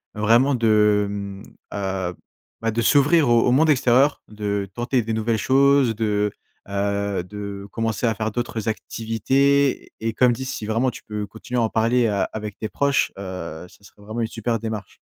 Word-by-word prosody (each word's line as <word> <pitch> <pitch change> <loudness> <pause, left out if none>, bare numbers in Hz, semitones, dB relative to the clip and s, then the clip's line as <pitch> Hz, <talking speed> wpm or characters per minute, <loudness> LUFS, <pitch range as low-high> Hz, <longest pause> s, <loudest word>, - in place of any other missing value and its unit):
vraiment 115 +6 +4
de, 105 -3 +3
mmh, 100 -1 -6 0.3
heu, 95 -3 -2 0.5
bah, 115 - 0
de 115 +2 -1
s'ouvrir 145 +3 +4
au 120 -1 +5
au - - +4
monde 155 +5 +4
extérieur, 130 +1 +3
de 100 -2 -3
tenter 120 +1 0
des 110 +1 -3
nouvelles 110 +1 0
choses, 135 -2 +4
de, 105 -1 0 0.4
heu, 100 -1 -1
de 100 0 -7
commencer 115 0 -1
à 115 - +2
faire 110 +1 -2
d'autres 115 -1 -3
activités 130 +6 +1
et 115 0 -2
comme 125 +1 +4
dit, 125 +3 -5
si 120 -4 -5
vraiment, 115 +4 +1
tu - - -12
peux 105 -1 -5
continuer 115 +4 -4
à - - +2
en 110 - +1
parler, 115 +2 +2
heu, 100 -3 +1
avec 105 -2 -6
tes 110 - -4
proches, 140 -1 +1
heu, 90 -3 -6
ça 100 - -21
serait 100 - -18
vraiment 110 +3 -4
une 115 - 0
super 115 +1 -2
démarche. 110 -2 -6
110 Hz, 185 wpm, -22 LUFS, 105-120 Hz, 0.5 s, au